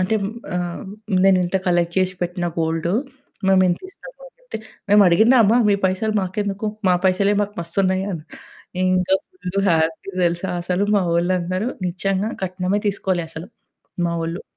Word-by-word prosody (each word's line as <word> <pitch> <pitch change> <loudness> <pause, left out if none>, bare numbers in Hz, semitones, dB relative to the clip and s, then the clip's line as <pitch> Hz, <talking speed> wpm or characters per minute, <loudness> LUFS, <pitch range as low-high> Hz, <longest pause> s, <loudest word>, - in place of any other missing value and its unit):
అంటే 220 +4 +1 0.4
ఆహ్, 175 +1 -4 0.4
నేనింత 185 -1 +3
కలెక్ట్ 175 -1 +1
చేసి 185 0 +1
పెట్టిన 175 0 -2
గోల్డు. 165 +2 0 0.5
మేమింతిస్తము." 195 - 0
అనంటే, - - -9 0.3
"మేమడిగిన్నామా 215 +4 +6
మీ - - +4
పైసలు 200 +4 -1
మాకెందుకు? 200 +2 -2 0.2
మా 180 - +5
పైసలే 195 +2 +3
మాకు 205 0 -5
మస్తున్నయి" 185 +2 0
అని. 160 -4 -6 0.6
ఇంకా 185 0 +2
ఫుల్లు 195 - -4
హ్యాపీ 160 +3 0
తెలుసా 175 +2 -1
అసలు 180 +3 0
మావొళ్ళందరూ. 180 +2 0 0.2
నిజంగా 195 +4 -1
కట్నమే 185 +2 -1
తీసుకోలే 190 -3 -1
అసలు, 165 +3 -8 0.6
మావొళ్ళు. 170 +1 -3
185 Hz, 120 wpm, -21 LUFS, 175-200 Hz, 0.6 s, మేమడిగిన్నామా